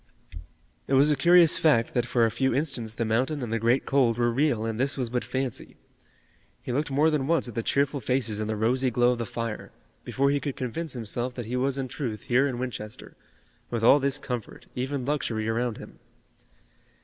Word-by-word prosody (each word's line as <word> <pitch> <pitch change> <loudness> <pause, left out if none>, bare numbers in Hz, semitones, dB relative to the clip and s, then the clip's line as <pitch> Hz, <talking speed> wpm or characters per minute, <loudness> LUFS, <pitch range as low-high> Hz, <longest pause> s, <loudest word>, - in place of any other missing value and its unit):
It 135 - +2
was 140 +3 +5
a - - +3
curious 170 +3 +5
fact 120 -8 +3
that 120 -1 0
for 120 -1 +3
a 115 - 0
few 130 +2 0
instants 130 -6 -1
the 115 - -1
mountain 130 +6 0
and 115 -2 -4
the 115 - 0
great 120 +4 +2
cold 125 -4 +2
were 120 0 +2
real 125 -3 +1
and 115 0 -3
this 135 +2 0
was 125 -3 -3
but 125 -1 -1
fancy. 130 -2 -4 0.9
He - - -4
looked 145 +5 -1
more 150 +4 +3
than 140 -3 0
once 165 -4 +1
at 120 - -7
the 115 - -2
cheerful 140 +4 0
faces 120 -3 -1
and 110 0 -3
the 110 - -1
rosy 125 +5 +1
glow 120 +1 +3
of 125 - -2
the 115 - -3
fire, 115 -1 -5 0.3
before 140 +1 +1
he 145 - +1
could 140 -2 -4
convince 135 +5 -4
himself 120 +1 -4
that 120 - -5
he 120 +3 -4
was 135 +2 0
in 135 -1 -2
truth 120 -4 -5
here 130 +3 +2
in 130 -3 -3
Winchester, 110 -4 -6 0.5
with 115 -2 -3
all 135 +5 +7
this 140 0 +1
comfort, 125 -5 -6
even 130 +1 -3
luxury, 120 -7 -2
around 115 0 -1
him. - - -12
125 Hz, 210 wpm, -26 LUFS, 115-140 Hz, 0.9 s, all